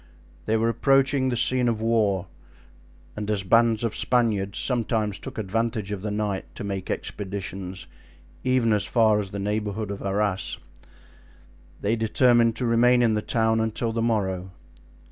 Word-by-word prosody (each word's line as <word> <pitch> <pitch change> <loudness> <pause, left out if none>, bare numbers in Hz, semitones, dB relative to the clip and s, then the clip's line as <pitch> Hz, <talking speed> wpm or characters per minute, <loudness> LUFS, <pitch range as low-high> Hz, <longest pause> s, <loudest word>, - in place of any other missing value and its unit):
They 110 +1 +2
were 115 +1 +1
approaching 135 +3 +2
the 120 - -1
scene 125 +1 +3
of 115 -2 -1
war; 110 -5 +1 0.9
and 105 0 -5
as 105 -3 0
bands 115 +3 +3
of 115 - -1
Spaniards 110 -6 +1
sometimes 110 -5 -1
took - - -9
advantage 110 0 -2
of 100 -2 -4
the 105 - -3
night 105 -2 -2
to - - -6
make 95 -2 -4
expeditions 95 -2 -5 0.6
even 125 -3 +2
as 105 - +2
far 110 -3 +3
as 100 -2 -3
the 100 - -6
neighborhood 105 +1 -2
of 100 - -6
Arras, 100 -1 -1 1.2
they 105 +3 +1
determined 115 +1 +3
to 125 - -2
remain 120 +1 +4
in 115 -2 +3
the 105 - 0
town 110 0 +1
until 110 +1 -1
the 115 - -1
morrow. 95 -5 -1
110 Hz, 155 wpm, -25 LUFS, 100-115 Hz, 1.2 s, remain